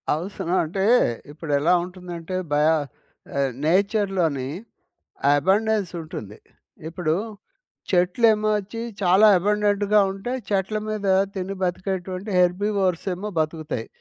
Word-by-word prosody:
అవసరం 180 +1 -4
అంటే 185 +5 -2 0.5
ఇప్పుడెలా 150 +1 +1
ఉంటుందంటే 180 -1 -7 0.2
బయ 150 +1 +3 0.7
ఆహ్, 135 -1 +1
నేచర్‌లోని 185 - +1 0.9
అబండెన్స్ 200 +4 +1
ఉంటుంది. 110 -10 -8 0.5
ఇప్పుడు 165 -1 -1 0.8
చెట్లేమో 215 +4 +3
ఒచ్చి 210 +3 -7 0.2
చాలా 190 +3 +6
అబండెంట్‌గా 205 +1 +2
ఉంటయి. 220 +7 -4
చెట్ల 200 +1 0
మీద 210 -2 -3 0.3
తిని 190 +1 -4
బతికేటువంటి 185 +2 -3
హెర్బివోర్స్ 185 0 +1
ఏమో 200 +4 -5
బతుకుతయి. 155 -6 -3
185 Hz, 95 wpm, -23 LUFS, 165-205 Hz, 0.9 s, చాలా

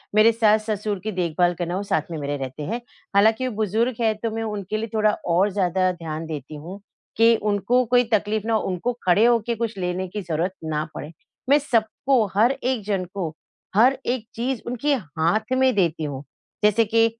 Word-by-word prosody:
मेरे 215 +2 +7
सास-ससुर 215 -2 +1
की 215 - -2
देखभाल 175 -1 +1
करना 175 +1 -2
वो 200 - -2
साथ 195 -1 +1
में 165 - -3
मेरे 145 -1 -3
रहते 135 +2 -6
हैं। 230 +10 -3 0.3
हालाँकि 220 +5 +4
वो 250 - -4
बुजुर्ग 220 +4 0
है 220 -1 +3
तो 230 - 0
मैं 225 - -2
उनके 210 -1 -3
लिए 225 +1 -3
थोड़ा 215 -1 +3 0.2
और 195 +4 +4
ज़्यादा 185 -1 +1
ध्यान 165 -2 -6
देती 155 -1 -6
हूँ 175 +7 -8 0.4
कि 230 +1 +6
उनको 215 +5 +2
कोई 245 +1 +4
तकलीफ़ 210 0 +1
ना 230 - +1
हो, 220 - +3
उनको 190 +7 -2
खड़े 190 +5 +5
होके 235 -1 +2
कुछ 225 -2 -3
लेने 180 0 -2
की 205 +3 -5
ज़रूरत 175 0 -1
ना 155 -1 -1
पड़े। 150 - -6 0.4
मैं 285 - +7
सबको 240 -1 +1
हर 225 +5 +5
एक 260 -4 -2
जन 195 -3 -1
को, 175 -6 -3 0.4
हर 250 +6 +5
एक 245 -2 -1
चीज़ 245 +1 -2
उनके 250 +4 0
हाथ 175 - -1
में 260 0 +4
देती 170 -5 +1
हूँ। 140 -2 -4 0.4
जैसे 210 +2 +4
कि 225 +1 +3
210 Hz, 195 wpm, -23 LUFS, 180-230 Hz, 0.4 s, मेरे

